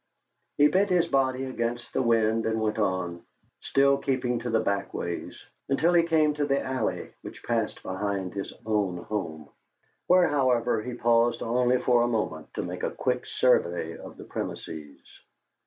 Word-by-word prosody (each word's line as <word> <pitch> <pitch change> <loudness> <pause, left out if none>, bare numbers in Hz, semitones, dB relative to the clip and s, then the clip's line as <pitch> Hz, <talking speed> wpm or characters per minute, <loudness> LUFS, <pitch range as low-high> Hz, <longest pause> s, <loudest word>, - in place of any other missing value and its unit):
He 145 - +7
bent 190 +6 +2
his 180 -2 +3
body 130 -3 +1
against 120 -1 -3
the - - +1
wind 115 -2 +2
and 110 0 0
went 110 0 -1
on, 90 -4 -1 0.4
still 140 0 +3
keeping 125 -3 -1
to 120 +1 -4
the 115 -1 +2
back 100 -1 -2
ways, 85 0 -4 0.3
until 160 +6 +3
he 170 - +6
came 160 -2 +2
to 145 0 -1
the 140 0 +2
alley 130 -4 -3
which - - -10
passed 115 -2 -2
behind 95 -1 -3
his 100 -1 -4
own 105 -5 0
home, 80 -6 -5 0.6
where, 180 0 +5
however, 125 -6 +2
he 125 +2 -5
paused 120 0 +2
only 125 +2 +2
for 120 -1 +3
a 120 - +2
moment 105 -9 -2
to - - -2
make - - -5
a - - 0
quick - - -2
survey 85 -1 +1
of - - -11
the - - -9
premises. 75 -3 -6
120 Hz, 170 wpm, -27 LUFS, 100-135 Hz, 0.6 s, He